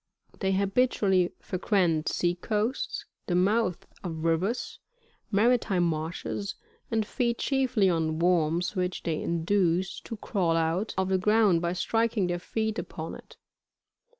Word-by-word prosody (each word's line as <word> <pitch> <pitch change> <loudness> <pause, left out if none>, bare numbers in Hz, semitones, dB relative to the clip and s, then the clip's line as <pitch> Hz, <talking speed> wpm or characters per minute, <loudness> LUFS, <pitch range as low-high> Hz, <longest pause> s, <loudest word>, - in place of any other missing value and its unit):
They 190 -1 +1
habitually 195 -2 +2
frequent 180 -4 +1
sea 175 0 +1
coasts, 215 +7 -2 0.2
the 175 - 0
mouths 190 0 +1 0.2
of 160 -3 -4
rivers, 175 +9 0 0.5
mantime 210 -3 +3
marshes, 165 +5 -2 0.3
and 220 -2 0
feed 235 0 -1
chiefly 255 -7 +2
on 160 -3 +1
worms, 175 +1 +1
which 180 0 -2
they 160 -2 -1
induce 175 +2 +1
to 225 - -7
crawl 180 -6 0
out 165 +6 0
of 190 0 +1
the 190 -1 +2
ground 210 -3 +4
by 170 0 0
striking 225 +1 +1
their 175 0 -1
feet 220 +4 -2
upon - - -6
it. - - -13
190 Hz, 130 wpm, -28 LUFS, 170-215 Hz, 0.5 s, ground